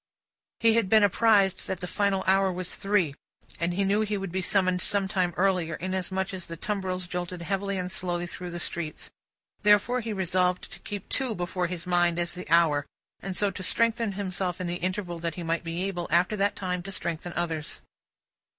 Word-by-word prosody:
He 225 -1 +5
had 225 -4 +2
been 220 0 +6
apprised 200 -2 +4
that 190 - -3
the 180 - -3
final 195 +1 +1
hour 190 0 +4
was 180 0 -3
Three, 195 -7 +1 0.5
and 170 +1 0
he 200 - +1
knew 200 +2 +2
he 210 -1 0
would 195 -2 -4
be 190 +1 -1
summoned 185 0 +2
some 200 0 +2
time 185 -3 +1
earlier, 180 -4 +2
inasmuch 190 +2 -2
as 185 -2 -6
the 165 - -7
tumbrils 185 -2 -2
jolted 180 0 -4
heavily 195 +1 -1
and 180 0 -3
slowly 175 -2 -1
through 180 +1 -6
the 175 0 -5
streets. 170 -2 -4 0.5
Therefore, 210 +4 +4
he 225 -1 -4
resolved 180 -2 0
to - - -9
keep 205 -2 -6
Two 260 -5 0
before 180 0 -1
his 170 -1 -5
mind, 175 -1 +3
as 170 0 -1
the 180 -1 -8
hour, 155 -3 +4 0.3
and 190 -2 -4
so 205 -1 +2
to 185 - -7
strengthen 230 +2 +1
himself 185 -2 -2
in 185 - -3
the 175 0 -2
interval 185 -1 -2
that 165 -1 -2
he 175 - -5
might 165 +1 -1
be 170 +2 -3
able, 175 -3 -2
after 175 +5 +3
that 200 0 +1
time, 180 -2 -2
to 195 +2 -7
strengthen 170 -2 -3
others. 165 -3 -3
185 Hz, 200 wpm, -27 LUFS, 175-195 Hz, 0.5 s, been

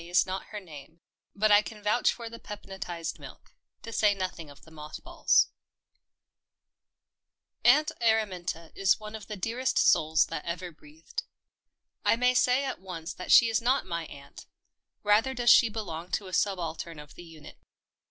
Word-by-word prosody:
IS 175 +2 +2
NOT 190 +1 -5
HER 210 - -7
NAME, 160 -3 -13 0.4
BUT 215 +1 +2
I 205 0 +7
CAN 210 -1 -10
VOUCH 210 +4 +2
FOR 235 -1 -7
THE 230 0 -9
PEPNOTISED 190 -5 -7
MILK, - - -13 0.3
TO 230 - -8
SAY 210 -1 +3
NOTHING 185 -5 -5
OF 145 - -16
THE 160 - -17
MOTH 150 -1 -9
BALLS - - +3 2.1
Aunt 300 +6 +5
Araminta 185 -7 0
is 195 +1 +2
one 215 0 -9
of 215 -3 -8
the 210 - -5
dearest 235 +7 -2
souls 160 +1 +4
that - - -6
ever 175 +1 -5
breathed. 160 - -8 0.8
I - - +4
may 250 +2 +2
say 255 +2 +3
at 265 - -5
once 175 -3 -7
that 180 - -6
she 235 - +8
is 225 0 +1
not 255 +4 +1
my 170 -2 -4
aunt 140 0 -13 0.3
— - - -57
rather 220 +6 +3
does 240 0 +4
she 235 - +7
belong 180 -6 -6
to 205 - -1
a 185 - -10
subaltern 170 -5 -2
of 150 -1 -12
the 175 - -12
unit. 160 -3 -14
190 Hz, 170 wpm, -28 LUFS, 165-225 Hz, 2.1 s, she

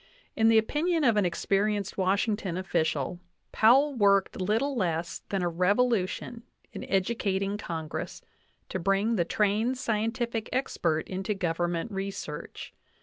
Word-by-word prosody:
In 225 -1 +3
the 225 0 +6
opinion 310 +9 +1
of 235 -5 +4
an 205 -3 +3
experienced 200 +3 0
Washington 195 -1 0
official; 165 -4 -1 0.3
Powell 270 +6 +5
worked 200 -5 +2
little 225 +9 0
less 170 -6 -2
than 195 -2 -1
a - - +1
revolution 205 +5 0 0.3
in - - -6
educating 195 0 0
Con 165 -6 -5
gress - - -6 0.5
to 190 - -3
bring 195 +5 +1
the 175 -5 +1
trained 215 +7 +1
scientific 230 -1 -2
expert 170 -11 -1
into 190 +2 -3
Government 175 +2 -1
research. 195 -6 -6
200 Hz, 130 wpm, -28 LUFS, 180-225 Hz, 0.5 s, the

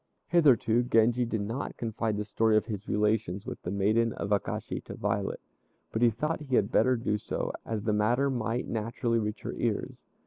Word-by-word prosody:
Hitherto 130 -9 +4
Genji 120 0 +3
did 115 -2 -2
not 115 +7 -4
confide 110 -2 -2
the 105 - -2
story 110 +1 +2
of 110 - +1
his 105 -2 -6
relations 105 -2 0
with - - -6
the - - -5
maiden 110 +4 +2
of 100 - -4
Akashi 100 - -1
to - - -7
Violet, - - -1 0.5
but 110 - -2
he 120 - +6
thought 150 +8 -2
he 135 -4 -1
had 100 -3 +2
better 125 +3 +4
do 105 -3 -1
so, - - -3
as 110 -2 -2
the 110 -1 +1
matter 120 +7 +2
might 120 -1 -2
naturally 115 +1 -1
reach 105 -1 -3
her - - -4
ears. - - -2
110 Hz, 195 wpm, -29 LUFS, 105-120 Hz, 0.5 s, he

